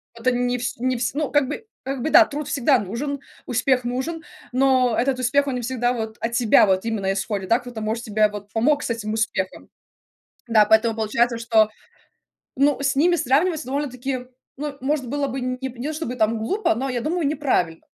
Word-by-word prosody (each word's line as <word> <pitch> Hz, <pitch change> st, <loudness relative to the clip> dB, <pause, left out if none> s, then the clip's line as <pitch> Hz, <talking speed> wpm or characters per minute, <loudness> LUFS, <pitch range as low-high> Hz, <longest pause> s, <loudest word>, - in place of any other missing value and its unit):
Это 235 Hz, +2 st, +1 dB
не 245 Hz, 0 st, 0 dB
вс 245 Hz, -, -4 dB
не 255 Hz, +1 st, 0 dB
вс 235 Hz, 0 st, -1 dB
ну 295 Hz, 0 st, -2 dB
как 290 Hz, -2 st, +3 dB
бы 300 Hz, -, -6 dB, 0.2 s
как 270 Hz, -1 st, -4 dB
бы 305 Hz, -, -1 dB
да, 335 Hz, +1 st, +8 dB
труд 295 Hz, -1 st, -5 dB
всегда 275 Hz, -2 st, +3 dB
нужен, 240 Hz, +8 st, -4 dB, 0.3 s
успех 250 Hz, +1 st, +1 dB
нужен, 265 Hz, +7 st, -3 dB, 0.3 s
но 255 Hz, -2 st, +3 dB
этот 260 Hz, +1 st, +1 dB
успех, 275 Hz, +3 st, +2 dB
он 265 Hz, -, -1 dB
не 245 Hz, -, -3 dB
всегда 245 Hz, 0 st, 0 dB
вот 220 Hz, -2 st, -5 dB
от 230 Hz, -, -1 dB
тебя 235 Hz, -3 st, +5 dB
вот 190 Hz, +2 st, +1 dB
именно 205 Hz, -4 st, -1 dB
исходит, 195 Hz, -1 st, -3 dB
да, 230 Hz, -, +4 dB
кто-то 245 Hz, -3 st, -8 dB
может 220 Hz, +2 st, -2 dB
тебе 215 Hz, -1 st, +2 dB
вот 205 Hz, 0 st, -9 dB
помог 285 Hz, +6 st, +2 dB
с -, -, -3 dB
этим 220 Hz, -2 st, -3 dB
успехом. 190 Hz, -4 st, -2 dB, 0.8 s
Да, 220 Hz, -2 st, +5 dB
поэтому 220 Hz, +1 st, +3 dB
получается, 230 Hz, +2 st, +1 dB
что, 220 Hz, -2 st, +3 dB, 0.9 s
ну, 280 Hz, 0 st, +2 dB
с 280 Hz, 0 st, +1 dB
ними 345 Hz, +5 st, +4 dB
сравнивать 315 Hz, +2 st, +1 dB
довольно-таки, 260 Hz, -2 st, -3 dB, 0.3 s
ну, 290 Hz, 0 st, -5 dB
может 270 Hz, -1 st, -1 dB
было 285 Hz, +3 st, -1 dB
бы 265 Hz, 0 st, -4 dB
нь 255 Hz, 0 st, -2 dB
п 260 Hz, -2 st, -6 dB
не 260 Hz, -, -3 dB
то 310 Hz, -, -3 dB
чтобы 295 Hz, -6 st, -4 dB
там 225 Hz, -1 st, +1 dB
глупо, 390 Hz, -, 0 dB
но 265 Hz, +4 st, -2 dB
я 245 Hz, -2 st, -2 dB
думаю, 330 Hz, +5 st, -1 dB
неправильно 260 Hz, -, 0 dB
250 Hz, 205 wpm, -22 LUFS, 225-280 Hz, 0.9 s, да